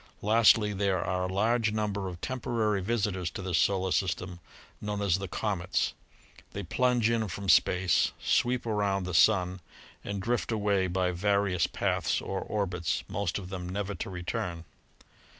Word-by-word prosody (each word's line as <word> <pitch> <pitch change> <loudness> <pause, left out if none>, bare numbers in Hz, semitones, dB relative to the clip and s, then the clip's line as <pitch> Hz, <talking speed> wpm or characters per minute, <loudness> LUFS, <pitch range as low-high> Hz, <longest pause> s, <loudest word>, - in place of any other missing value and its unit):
Lastly 110 -1 +5
there 95 -2 +1
are 90 0 -1
a 90 - -3
large 110 +3 +2
number 105 -2 -2
of 90 -2 -7
temporary 115 -5 -1
visitors 95 -4 -1
to 95 - -7
this 90 -3 +1
solar 95 -1 +1
system 90 -1 -1 0.4
known 105 -1 -3
as 95 -2 +1
the 95 - -4
"'comets." 90 -1 -1 0.6
They 100 - -4
plunge 125 +4 +2
in 115 -2 0
from 95 +2 -5
space, 90 -1 +4
sweep 125 0 +1
around 100 -3 0
the 90 0 -4
sun 90 +1 +4 0.4
and 100 -1 -4
drift 120 +4 -1
away 100 -3 +1
by 90 0 0
various 100 -1 +1
paths - - 0
or 95 - -3
orbits, 90 -6 -2
most 95 -3 -2
of 95 -3 -7
them 90 -2 -5
never 100 +1 -3
to - - -5
return. 85 -2 -4
100 Hz, 155 wpm, -29 LUFS, 90-105 Hz, 0.6 s, Lastly